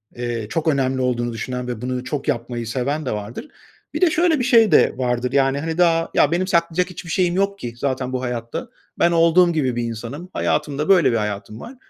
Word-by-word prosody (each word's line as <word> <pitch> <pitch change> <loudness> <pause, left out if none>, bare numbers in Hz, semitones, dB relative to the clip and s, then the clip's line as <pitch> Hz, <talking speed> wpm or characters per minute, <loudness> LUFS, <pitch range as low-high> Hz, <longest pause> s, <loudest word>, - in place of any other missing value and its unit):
eee, 120 -3 -4
çok 165 +4 -2
önemli 135 -3 +1
olduğunu 120 -2 -1
düşünen 125 +2 -4
ve 120 -3 -5
bunu 125 0 -3
çok 140 +1 -4
yapmayı 120 -4 -2
seven 140 +5 -2
de - - -2
vardır. 105 - -6 0.5
Bir - - -3
de 360 - +5
şöyle 325 -2 +2
bir - - 0
şey 230 -5 +5
de - - +5
vardır: 125 -1 -1
Yani, 135 0 +2
hani, 160 +2 -3
daha, 165 -2 +3
"Ya, 145 - +3
benim 180 +2 0
saklayacak 170 0 +1
hiçbir 175 -1 -9
şeyim 180 -1 +1
yok 200 +1 0
ki 120 -8 -6
zaten 130 0 -2
bu 130 - -2
hayatta. 120 - -4 0.3
Ben 170 - +4
olduğum 170 +1 +4
gibi 130 -6 0
bir 120 - -1
insanım. 120 +9 -6
Hayatım 150 -2 -1
da 150 +2 -2
böyle 185 -7 +5
bir 115 - +1
hayatım 105 0 -4
var. 240 - -10
135 Hz, 215 wpm, -21 LUFS, 120-170 Hz, 0.5 s, de